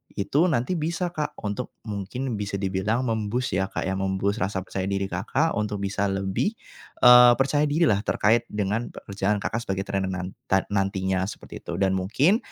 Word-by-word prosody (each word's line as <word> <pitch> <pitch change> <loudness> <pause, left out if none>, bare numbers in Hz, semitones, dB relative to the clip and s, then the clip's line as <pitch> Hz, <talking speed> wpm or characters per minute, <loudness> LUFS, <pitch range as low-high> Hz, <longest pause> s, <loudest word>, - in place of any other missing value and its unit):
itu 140 - +2
nanti 160 +2 0
bisa 165 +3 -1
Kak 155 -3 -3
untuk 105 +4 -4
mungkin 110 +3 -4
bisa 100 -1 -3
dibilang 100 +5 0
mem-boost 115 +1 -1
ya 95 - +1
Kak - - -4
ya, 95 - -1
mem-boost 95 +2 0
rasa 95 +1 -1
percaya 95 0 -4
diri 100 0 -1
Kakak 120 - 0
untuk 105 -1 -2
bisa 100 0 -1
lebih, 95 - -1 0.5
eee, 125 0 +9
percaya 145 +3 +2
diri 155 +4 +1
lah 100 - +3
terkait 110 +3 +2
dengan 105 +3 -1
pekerjaan 100 0 -2
Kakak 115 +2 -3
sebagai 95 0 -2
trainer 95 -1 -2
nan 95 0 -4 0.2
ta 95 0 +3
nantinya 95 -2 0
seperti - - -8
itu. - - -7
Dan 95 -1 +2
mungkin 135 - +3
105 Hz, 175 wpm, -25 LUFS, 95-125 Hz, 0.5 s, eee